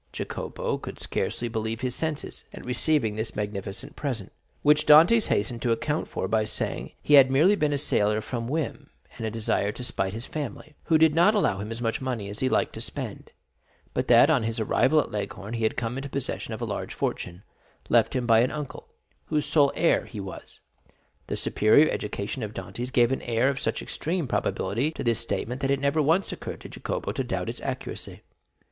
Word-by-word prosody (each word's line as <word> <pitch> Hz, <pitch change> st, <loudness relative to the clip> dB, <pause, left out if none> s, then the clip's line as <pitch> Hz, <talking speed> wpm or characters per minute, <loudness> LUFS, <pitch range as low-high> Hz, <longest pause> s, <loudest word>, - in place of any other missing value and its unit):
Jacopo -, -, -3 dB
could -, -, -8 dB
scarcely 120 Hz, -, -2 dB
believe 110 Hz, 0 st, -3 dB
his 125 Hz, -1 st, -1 dB
senses 155 Hz, +1 st, -3 dB
at -, -, -10 dB
receiving 125 Hz, -2 st, +1 dB
this 110 Hz, +1 st, -4 dB
magnificent 105 Hz, +7 st, -5 dB
present, 125 Hz, -9 st, -4 dB, 0.3 s
which 150 Hz, +1 st, +4 dB
Dantès 165 Hz, +10 st, +7 dB
hastened 115 Hz, +3 st, 0 dB
to 120 Hz, -, +1 dB
account 150 Hz, +7 st, -1 dB
for 95 Hz, -, -3 dB
by 110 Hz, +2 st, +2 dB
saying 110 Hz, -, -2 dB
that -, -, -21 dB
he 150 Hz, -, +2 dB
had 135 Hz, -2 st, +9 dB
merely 155 Hz, +10 st, +5 dB
been 150 Hz, -6 st, +1 dB
a 145 Hz, -, +1 dB
sailor 105 Hz, -6 st, +2 dB
from 115 Hz, +1 st, -4 dB
whim 155 Hz, +3 st, -3 dB, 0.3 s
and 115 Hz, -, -2 dB
a -, -, -1 dB
desire 105 Hz, -2 st, 0 dB
to 125 Hz, -, -7 dB
spite 95 Hz, -5 st, -2 dB
his 115 Hz, +3 st, -6 dB
family, 150 Hz, 0 st, -6 dB
who 160 Hz, -, +4 dB
did 160 Hz, -1 st, +5 dB
not 175 Hz, +7 st, +5 dB
allow 105 Hz, -, +2 dB
him 105 Hz, +2 st, -5 dB
as 115 Hz, +1 st, -5 dB
much 115 Hz, +2 st, -1 dB
money 120 Hz, -6 st, -3 dB
as 105 Hz, -, -6 dB
he 130 Hz, -, +1 dB
liked -, -, +1 dB
to -, -, -7 dB
spend; -, -, -6 dB, 0.6 s
but -, -, -1 dB
that 125 Hz, +5 st, +7 dB
on 140 Hz, -6 st, +3 dB
his 115 Hz, +1 st, -2 dB
arrival 130 Hz, +7 st, +3 dB
at -, -, -1 dB
Leghorn 100 Hz, +1 st, -5 dB
he 115 Hz, -, -3 dB
had 110 Hz, -, 0 dB
come 120 Hz, +1 st, -2 dB
into 140 Hz, +1 st, -6 dB
possession 135 Hz, -1 st, -3 dB
of -, -, -4 dB
a -, -, 0 dB
large -, -, -4 dB
fortune, 90 Hz, +2 st, -3 dB, 0.4 s
left -, -, +3 dB
him 125 Hz, -1 st, 0 dB
by 115 Hz, -1 st, +5 dB
an 125 Hz, +2 st, +3 dB
uncle, 150 Hz, -3 st, -6 dB, 0.4 s
whose 150 Hz, -2 st, 0 dB
sole 150 Hz, -2 st, +4 dB
heir 170 Hz, -, +3 dB
he 110 Hz, -, -8 dB
was. 95 Hz, -1 st, -9 dB, 0.7 s
The -, -, -3 dB
superior 125 Hz, +9 st, +4 dB
education 105 Hz, +4 st, -4 dB
of 110 Hz, 0 st, -5 dB
Dantès 125 Hz, +2 st, -5 dB
gave 120 Hz, -1 st, +4 dB
an 135 Hz, -, -1 dB
air 120 Hz, +2 st, +1 dB
of 135 Hz, -1 st, -2 dB
such -, -, -2 dB
extreme 165 Hz, -2 st, -2 dB
probability 115 Hz, +5 st, 0 dB
to -, -, -5 dB
this 115 Hz, -2 st, +2 dB
statement 125 Hz, +2 st, -3 dB
that 135 Hz, -, 0 dB
it 140 Hz, 0 st, +2 dB
never 140 Hz, +3 st, +2 dB
once 165 Hz, +6 st, +2 dB
occurred -, -, -6 dB
to -, -, -9 dB
Jacopo -, -, -4 dB
to -, -, -2 dB
doubt -, -, -3 dB
its -, -, -6 dB
accuracy. -, -, -5 dB
125 Hz, 210 wpm, -26 LUFS, 110-150 Hz, 0.7 s, had